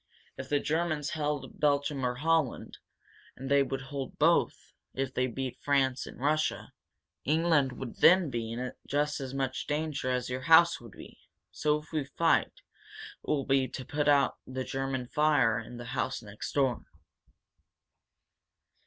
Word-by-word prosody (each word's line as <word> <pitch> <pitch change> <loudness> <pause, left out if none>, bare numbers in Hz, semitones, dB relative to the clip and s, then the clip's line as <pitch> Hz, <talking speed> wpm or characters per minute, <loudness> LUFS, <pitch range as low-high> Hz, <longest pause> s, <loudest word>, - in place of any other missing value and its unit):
If 130 0 -8
the 145 - +2
Germans 155 -1 -1
held 145 -4 -3
Belgium 145 -1 +1
or 125 -1 0
Holland 160 0 0 0.6
and 135 +2 -7
they 140 0 +5
would 135 -1 -2
hold 135 0 -6
both, - - +2 0.2
if 135 0 -2
they 130 0 +1
beat 130 +1 -5
France 135 -2 +1
and - - -11
Russia 155 +3 0 0.5
England 155 -3 +2
would 125 -1 -7
then 180 -4 +5
be 115 -2 -3
in 125 +2 -4 0.2
just 145 +1 0
as 135 0 -5
much 135 -1 -2
danger 150 -3 -2
as 125 -1 -1
your 125 +1 -4
house 165 +2 +6
would 115 -4 -12
be. - - -13 0.3
So 150 +11 +1
if 150 - -12
we 155 -3 -1
fight, 160 +4 +2
it - - -22 0.6
will 140 -3 0
be 135 -1 +2
to 130 +1 -7
put 150 -1 -1
out 140 -1 +3
the 130 0 -4
German 135 -1 -3
fire 140 -4 +2
in 115 +2 -9
the 120 - -8
house - - -2
next 105 0 -7
door. 135 -3 +1
135 Hz, 160 wpm, -30 LUFS, 130-150 Hz, 0.6 s, house